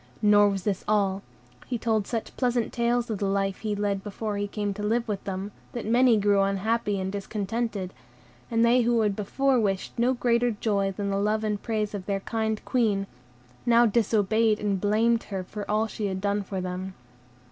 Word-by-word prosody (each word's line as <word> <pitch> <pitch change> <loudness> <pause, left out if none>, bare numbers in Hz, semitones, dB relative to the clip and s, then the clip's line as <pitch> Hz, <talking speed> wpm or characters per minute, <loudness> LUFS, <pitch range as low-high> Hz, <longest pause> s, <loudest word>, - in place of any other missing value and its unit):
Nor 205 0 +6
was 195 -2 -3
this 200 -2 -1
all; 200 -2 +1 0.5
he 245 - -1
told 220 -3 0
such 230 -2 -4
pleasant 245 -3 0
tales 235 0 0
of 210 - -3
the 200 - 0
life 195 -1 0
he 215 -2 -2
led 200 -1 -1
before 210 +1 -4
he 205 0 -2
came 205 0 -2
to 205 - -7
live 230 +3 0
with 205 -3 -3
them, 195 +1 -4 0.2
that 240 - -4
many 240 +1 +4
grew 205 -1 +3
unhappy 200 +1 0
and 190 0 -2
discontented, 205 0 -3 0.6
and 230 0 +3
they 245 +2 +5
who 235 -1 +2
had 210 -2 +1
before 260 +6 +1
wished 200 +1 -2
no 250 +2 +3
greater 240 0 +2
joy 205 -3 0
than 200 +1 -3
the 195 - 0
love 215 +2 +1
and 210 -1 -1
praise 215 -3 -2
of 195 -2 -6
their 195 -1 -1
kind 220 0 -2
Queen, 215 -6 +1 0.6
now 235 0 +5
disobeyed 220 0 +2
and 200 -3 -1
blamed 225 +3 +2
her 190 -2 -4
for 205 +2 -7
all 215 +1 +2
she 215 -1 -3
had 190 -1 -3
done 200 +1 0
for 195 -1 -5
them. 185 +1 -5
210 Hz, 195 wpm, -26 LUFS, 200-230 Hz, 0.6 s, Nor